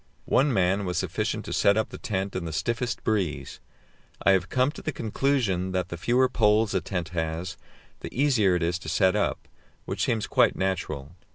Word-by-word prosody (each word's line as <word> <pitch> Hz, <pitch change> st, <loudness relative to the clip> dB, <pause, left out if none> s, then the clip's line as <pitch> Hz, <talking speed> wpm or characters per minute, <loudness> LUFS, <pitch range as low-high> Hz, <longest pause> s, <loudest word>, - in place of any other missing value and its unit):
One 140 Hz, +2 st, +3 dB
man 95 Hz, -2 st, +2 dB
was 90 Hz, -3 st, -2 dB
sufficient -, -, -2 dB
to -, -, -4 dB
set 100 Hz, +1 st, +4 dB
up 110 Hz, -, 0 dB
the -, -, -9 dB
tent 95 Hz, -2 st, -3 dB
in 90 Hz, -, -2 dB
the 80 Hz, -, -4 dB
stiffest 120 Hz, +9 st, -2 dB
breeze; 80 Hz, -11 st, -1 dB, 0.6 s
I 100 Hz, -, +5 dB
have 95 Hz, -1 st, +2 dB
come 130 Hz, +2 st, +2 dB
to -, -, -10 dB
the 155 Hz, -, -2 dB
conclusion 110 Hz, -, 0 dB
that 90 Hz, -1 st, -1 dB
the -, -, -4 dB
fewer 120 Hz, +8 st, +2 dB
poles 105 Hz, -3 st, +2 dB
a 95 Hz, -, +1 dB
tent 90 Hz, -2 st, -3 dB
has, 85 Hz, +2 st, -3 dB, 0.4 s
the -, -, -6 dB
easier 120 Hz, -9 st, +3 dB
it 90 Hz, -, 0 dB
is 85 Hz, +1 st, 0 dB
to 80 Hz, -, -7 dB
set 95 Hz, +3 st, +3 dB
up, 105 Hz, -, -1 dB, 0.4 s
which -, -, -2 dB
seems 110 Hz, -3 st, 0 dB
quite -, -, +3 dB
natural. 80 Hz, -7 st, -2 dB
95 Hz, 195 wpm, -26 LUFS, 90-115 Hz, 0.6 s, I